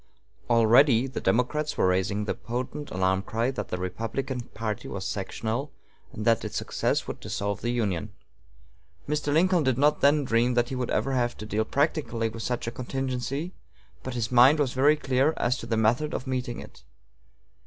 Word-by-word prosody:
Already 120 +2 +5
the 130 -2 -5
Democrats 125 +9 0
were - - +3
raising 95 +3 +1
the - - -1
potent 130 +5 -5
alarm 95 +1 +1
cry 115 +5 -1
that 105 -6 -5
the 90 - -3
Republican 115 +8 -3
party 110 -3 -5
was 95 -1 -5
sectional, 110 +8 -3 0.4
and 105 - -6
that 115 -2 +3
its - - -4
success - - -1
would - - -6
dissolve 100 0 -3
the 120 - -1
Union. 105 -4 -1 1.0
Mr. 150 0 -1
Lincoln 175 +3 +3
did 130 -4 +1
not 145 +2 +3
then 145 +1 +4
dream 120 0 +2
that 120 0 +2
he 130 - -3
would 125 -1 -2
ever 135 - 0
have 120 -2 0
to 105 - -7
deal 110 +1 -1
practically 140 -6 0
with 115 +1 -8
such 125 +1 -2
a 115 - -3
contingency, 135 +5 -3 0.5
but 130 -1 -6
his 115 -1 -2
mind 125 +5 +7
was 140 -4 0
very 145 +4 +4
clear 135 +1 +1
as 120 +1 +1
to - - -7
the 115 - 0
method 120 +8 +1
of 125 - -4
meeting 125 -2 -3
it. - - -12
120 Hz, 185 wpm, -27 LUFS, 110-135 Hz, 1.0 s, mind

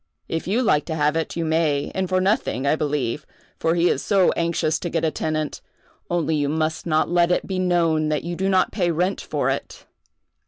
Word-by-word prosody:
If 165 +1 -3
you 225 +7 +1
like 150 -10 +2
to 160 - -3
have 150 0 +1
it, 165 -1 -2
you 170 -1 -1
may, 155 -3 +1
and 190 -1 -2
for 185 0 +2
nothing, 185 - 0
I 140 - +3
believe, 145 -3 -2 0.4
for 165 +1 +1
he 175 +1 +3
is - - +1
so 195 -3 +3
anxious 170 -2 0
to 175 - -4
get 165 -1 0
a 160 - +1
tenant; 155 -1 -3 0.5
only 165 -2 0
you 145 -1 0
must 160 +2 -1
not 155 -1 +2
let 175 0 +3
it - - +1
be 190 -1 -3
known 165 -4 +2
that 150 -1 -1
you 175 +1 -4
do 190 +2 -1
not 190 -1 +2
pay 180 -4 0
rent 180 +4 0
for - - -1
it." - - -6
165 Hz, 220 wpm, -23 LUFS, 155-180 Hz, 0.5 s, I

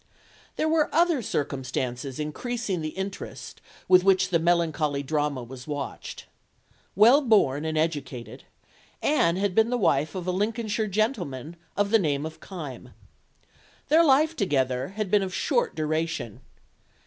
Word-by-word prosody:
There 315 - 0
were 315 -1 +2
other 335 -4 +3
circumstances 130 - -3
increasing 195 +5 -3
the 155 - -3
interest 195 +1 -6 0.3
with 185 -1 +6
which 195 0 +3
the 170 -3 +2
melancholy 160 -4 +1
drama 145 -2 -1
was 125 +2 -10
watched. 145 -2 -6 0.7
Well 235 - +7
born 180 - +3
and 160 0 -2
educated, 135 -6 -3 0.6
Anne 170 - +3
had 195 0 0
been 220 +3 +3
the 245 - 0
wife 155 - +1
of 180 -2 -4
a 185 - 0
Lincolnshire 215 +2 -1
gentleman 180 - -2 0.2
of 205 0 +1
the 225 - +6
name 150 -5 0
of 160 0 -8
Kyme. 155 -9 -9 0.9
Their 320 +2 +6
life 310 +2 +4
together 130 - 0
had 200 0 -4
been 210 - +4
of 190 -1 -3
short 480 0 0
duration. 155 -7 -2
175 Hz, 140 wpm, -26 LUFS, 145-215 Hz, 0.9 s, Well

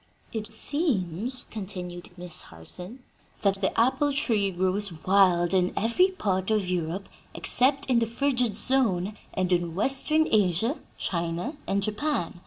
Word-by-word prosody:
"It 220 -1 -4
seems," 240 - 0
continued 180 -4 -6
Miss 175 -2 -5
Harson, 180 - -8 0.4
"that 195 -1 +1
the 190 - 0
apple 265 +5 +3
tree 225 -8 +1
grows 190 +2 -1
wild 185 -2 +4
in 180 -1 +3
every 235 - +3
part 195 - -2
of 210 -4 +1
Europe 180 +2 -2 0.3
except 275 +2 +2
in 250 -3 +3
the 230 - 0
frigid 245 -2 0
zone 215 -5 +3 0.2
and 185 -1 +1
in 170 -2 0
Western 275 - +2
Asia, 215 - +2 0.2
China 170 - -2
and 200 0 0
Japan. 215 - -2
200 Hz, 135 wpm, -27 LUFS, 180-250 Hz, 0.4 s, wild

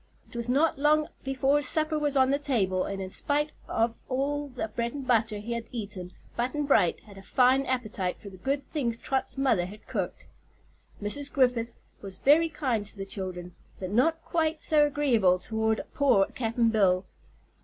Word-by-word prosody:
It - - -13
was 235 0 -3
not 285 +3 +2
long 300 +1 +3
before 270 +2 +2
supper 310 +3 +1
was 290 -2 0
on 260 0 +4
the 280 - +1
table 200 -11 0
and 195 -1 -4
in 190 -1 -5
spite 295 +6 0 0.2
of 225 +1 +1 0.2
all 285 +3 -1
the 250 -4 -4
bread 235 +3 -3
and 275 -2 -5
butter 225 -3 +2
he 220 +3 -4
had 230 -1 -5
eaten 200 -6 -5 0.2
Button 260 +5 -1
Bright 210 - +3
had 200 -2 -14
a - - -11
fine 255 +6 +3
appetite 215 -8 -2
for 200 - -10
the 185 - -12
good 275 +8 -1
things 240 -7 -2
Trot's 265 +2 -2
mother 225 -10 +2
had 210 +3 -12
cooked. - - -4 0.8
Mrs. 285 +7 0
Griffith 245 -3 +1 0.2
was 195 -2 -7
very 320 +4 +4
kind 255 -9 -1
to 210 - -12
the 195 - -4
children, 185 -3 -5 0.3
but 185 -1 -5
not 320 +9 +2
quite 320 -1 0
so 300 -1 +4
agreeable 240 -11 +3
toward 220 +3 -1
poor 255 -9 +4
Cap'n 230 -1 +1
Bill. 190 -4 +3
245 Hz, 180 wpm, -28 LUFS, 205-285 Hz, 0.8 s, on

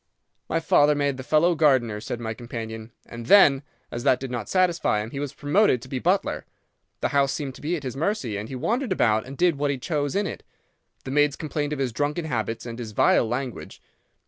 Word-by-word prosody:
"'My 165 - +1
father 150 -2 +4
made 140 -2 0
the 130 - -6
fellow 155 +6 +3
gardener,' 130 -9 +2
said 120 - -5
my 110 -1 -4
companion, 115 -1 -7
'and 115 0 -9
then, 145 -8 +6 0.3
as 120 - -4
that 125 - +3
did 135 -1 -6
not 120 -4 -4
satisfy 175 - +2
him, 110 +2 -5
he 140 - -5
was 145 -2 -3
promoted 145 - +2
to - - -10
be 130 0 -3
butler. 185 +7 0 0.6
The - - +1
house 140 -1 +2
seemed 140 -3 -4
to - - -14
be 160 +4 -1
at 150 - -6
his 130 -2 -5
mercy, 140 - -1
and 105 +2 -5
he 135 - -6
wandered 235 - -1
about 110 0 +1
and 135 +1 -9
did 175 -4 +2
what 145 0 +1
he 140 - -1
chose 145 +2 -2
in 200 +1 +1
it. 175 - -5 0.6
The 130 - -6
maids 145 0 +3
complained 150 -2 -3
of 150 - -2
his 130 -4 -2
drunken 150 +6 -1
habits 115 -5 -3
and 115 0 -7
his 110 -3 -6
vile 110 - +3
language. 125 +1 -5
135 Hz, 225 wpm, -24 LUFS, 120-155 Hz, 0.6 s, then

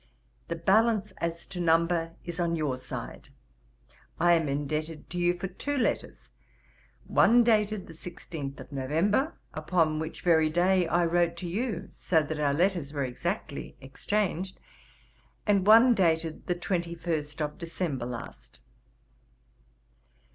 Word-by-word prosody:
The 170 - -2
balance, 210 +4 +2
as 170 0 -3
to 180 - -8
number, 165 0 +2
is 175 0 -6
on 170 -1 +1
your 150 -5 -1
side. 130 - -8 0.9
I 175 +1 +5
am 165 -3 +2
indebted 150 +3 -3
to 175 - -3
you 175 0 +2
for 175 - -4
two 285 +10 -4
letters; 250 - -2 0.8
one 240 +1 +5
dated 215 -3 +2
the 165 - -11
16th 160 -4 -7
of - - -11
November, 165 - 0 0.2
upon 155 0 +1
which 160 +1 -5
very 160 -3 +4
day 180 +2 +3
I 170 +2 +2
wrote 170 0 +1
to 175 - -5
you, 205 +1 -2
so 160 -3 +1
that 150 +1 -4
our 145 -1 +2
letters 175 -4 +1
were 140 -2 -1
exactly 150 - -4
exchanged, 185 +6 -2 0.9
and 200 -2 +2
one 230 +3 +8
dated 165 -5 0
the 175 - +1
21st 170 -4 -3
of 150 -1 -3
December 165 -7 -3
last. 120 - -9
170 Hz, 135 wpm, -28 LUFS, 155-185 Hz, 0.9 s, one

